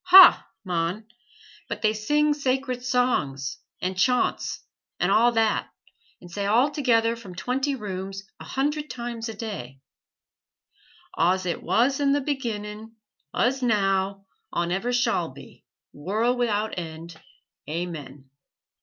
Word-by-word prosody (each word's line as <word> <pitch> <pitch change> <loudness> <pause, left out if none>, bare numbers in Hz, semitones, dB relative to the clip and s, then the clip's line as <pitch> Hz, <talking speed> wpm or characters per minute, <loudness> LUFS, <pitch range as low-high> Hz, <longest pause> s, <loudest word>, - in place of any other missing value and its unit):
"Huh, 375 +1 +10 0.2
mon! 180 +3 -2 0.6
but - - -5
they 215 0 +4
sing 295 +8 +2
sacred 260 -3 -1
songs, 240 - 0 0.2
and 185 +1 -2
chaunts, 250 +6 +1 0.4
and - - +2
a' 235 +2 +5
that, 225 -1 +2 0.5
and 175 - -13
say 200 +2 -2
all 245 +8 +4
together 235 -6 +2
from 200 -6 -11
twenty 265 +10 -1
rooms, 195 -3 -5 0.2
a - - -8
hundred 295 +2 -1
times 235 -1 -5
a 220 - -6
day, 165 - -6 1.4
'Aws 185 +3 +3
ut 175 - -2
wuz 265 +5 +2
in 285 0 +3
th' 270 - -7
beginnin,' 225 -5 -4 0.4
uz 265 +3 +2
now 195 -4 +1 0.3
awn 170 0 -1
ever 195 +7 0
shawl 245 +1 +1
be, - - -14 0.3
worl' 215 +11 0
wi'out 220 -3 0
end, 165 0 -8 0.5
Aamen.' 155 -4 -5
220 Hz, 130 wpm, -25 LUFS, 185-250 Hz, 1.4 s, Huh